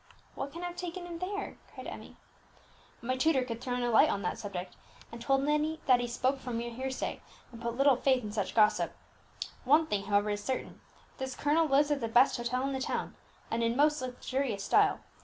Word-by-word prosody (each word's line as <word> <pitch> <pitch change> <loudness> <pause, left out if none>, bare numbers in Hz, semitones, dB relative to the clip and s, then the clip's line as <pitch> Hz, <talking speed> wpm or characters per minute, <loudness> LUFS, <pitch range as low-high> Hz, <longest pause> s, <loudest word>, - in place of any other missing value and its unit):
"What 275 +1 -5
can 340 +4 -7
have 350 0 -4
taken 355 0 -5
him 340 -1 -7
there?" 400 +3 -4
cried - - -9
Emmie. - - -9 0.9
"My 255 +2 0
tutor 265 0 +3
could 230 -2 -5
throw 250 -2 -2
no 245 -1 0
light 225 - +6
on 200 - -1
that 180 - -2
subject, 185 -3 -6 0.4
and 230 0 -8
told 270 +2 +2
me 300 +2 +1
that 255 -2 +5
he 245 - -1
spoke 255 +3 0
from 245 -3 -4
mere 235 +1 -3
hearsay, 260 +2 -4 0.3
and 230 -1 -11
put 235 0 -3
little 275 -2 +5
faith 260 -2 +2
in 210 - -5
such 205 -2 -2
gossip. 215 -1 +3 0.7
One 300 +5 +5
thing, 205 -8 -2
however, 205 0 +2
is 205 0 -3
certain, 260 +4 -4 0.4
this 265 -1 -4
colonel 310 +3 +2
lives 290 +1 +3
at 285 -2 +1
the 230 - -1
best 245 +4 +5
hotel 245 +2 -1
in 275 0 -1
the 265 - -2
town, - - -2 0.4
and 230 - 0
in 230 +1 +1
most 300 0 +3
luxurious 255 -3 -2
style. - - +3
255 Hz, 210 wpm, -31 LUFS, 230-285 Hz, 0.9 s, light